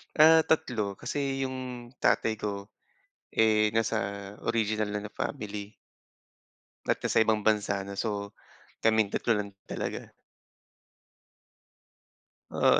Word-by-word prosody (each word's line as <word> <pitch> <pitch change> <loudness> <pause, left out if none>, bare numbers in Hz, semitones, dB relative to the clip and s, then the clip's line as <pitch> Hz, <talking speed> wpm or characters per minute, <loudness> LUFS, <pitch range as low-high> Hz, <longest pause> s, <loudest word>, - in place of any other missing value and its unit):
Ah, 160 +1 +8
3 110 -10 +1
kasi 135 -2 -2
yung 125 -2 -5
tatay 110 -2 +2
ko, 100 0 -4 0.6
eh, 110 -1 +4
nasa 115 -1 +2 0.4
original 110 -2 0
na, 105 0 -3
na 105 - -8
family. 105 -5 -4 1.1
At - - +1
nasa - - +3
ibang 110 -1 +2
bansa 105 -2 +2
na. 100 0 -7
So, 100 -2 -3 0.5
kaming 110 -2 +4
3 115 - +1
lang 100 -1 -3 0.2
talaga. - - -5 2.4
Oo. - - +4
110 Hz, 110 wpm, -29 LUFS, 105-120 Hz, 2.4 s, Ah